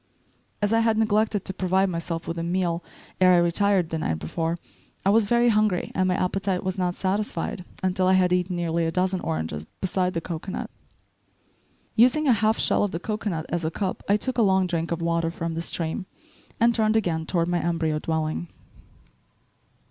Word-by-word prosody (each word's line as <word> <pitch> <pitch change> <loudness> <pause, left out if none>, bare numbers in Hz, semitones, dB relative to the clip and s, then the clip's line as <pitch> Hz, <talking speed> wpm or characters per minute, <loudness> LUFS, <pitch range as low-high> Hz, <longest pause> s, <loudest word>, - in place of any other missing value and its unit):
As 205 +2 +2
I 225 - +4
had 225 -1 +2
neglected 215 -2 +1
to 190 - -3
provide 190 +1 +1
myself 165 0 -4
with 165 0 -3
a - - -2
meal 175 -1 -1 0.4
ere 185 -1 +6
I - - +6
retired 175 +1 +2
the 160 - -1
night 80 - -1
before, 165 - -2 0.5
I 195 - +5
was 215 -1 +4
very 240 +2 +4
hungry 210 -4 +1
and 185 -1 +1
my 180 - +2
appetite 190 0 -1
was 185 0 -2
not 180 -2 -1
satisfied 190 -2 -2 0.2
until 185 0 +1
I 185 - +5
had 180 -1 +3
eaten 180 0 0
nearly 170 -1 0
a - - -1
dozen 185 +2 0
oranges, 80 - -3
beside 185 -1 0
the - - +1
cocoanut. 170 +3 -5 1.2
Using 255 +7 +4
a 255 - +6
half 220 +1 +2
shell - - +2
of 205 - +1
the 165 - -4
cocoanut 205 -5 -3
as 170 -1 -2
a 160 - 0
cup, 185 +3 -3
I 205 - +5
took 255 +3 -2
a - - +5
long 190 -3 +3
drink 170 -2 -2
of 170 0 -2
water 170 0 +1
from 165 0 -4
the 165 - -3
stream 170 +3 -3 0.5
and 235 +1 +4
turned 220 -1 +2
again 160 -6 -1
toward 170 -2 +1
my 175 0 +1
embryo 165 -2 0
dwelling. 160 +1 -2
180 Hz, 195 wpm, -25 LUFS, 165-205 Hz, 1.2 s, ere